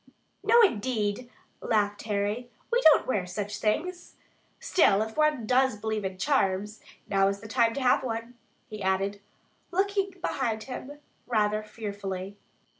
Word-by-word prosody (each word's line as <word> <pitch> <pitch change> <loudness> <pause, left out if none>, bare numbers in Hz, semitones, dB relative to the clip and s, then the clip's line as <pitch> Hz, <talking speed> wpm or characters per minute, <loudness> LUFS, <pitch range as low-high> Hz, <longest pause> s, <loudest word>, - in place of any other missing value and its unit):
"No, 470 +2 +6
indeed," 230 - 0 0.3
laughed 205 -2 0
Harry. 210 +3 -2 0.2
"We 480 +1 +3
don't 315 -7 +6
wear 200 -8 -1
such 205 +3 -4
things. 345 +12 -2 0.4
Still, 215 - +3
if 220 0 -8
one 305 -6 +2
does 255 -1 +3
believe 215 0 -2
in 190 -1 -4
charms, 210 -4 0 0.3
now 195 -1 +3
is 200 0 -1
the 220 - -10
time 230 0 +2
to 280 - -2
have 250 - +4
one," 230 -1 -4 0.3
he 215 -1 -8
added, 195 +1 0 0.5
looking 395 +2 0
behind 225 -9 -2
him 270 +3 -7 0.3
rather 215 -3 +1
fearfully. 200 -3 -6
220 Hz, 140 wpm, -28 LUFS, 205-260 Hz, 0.5 s, No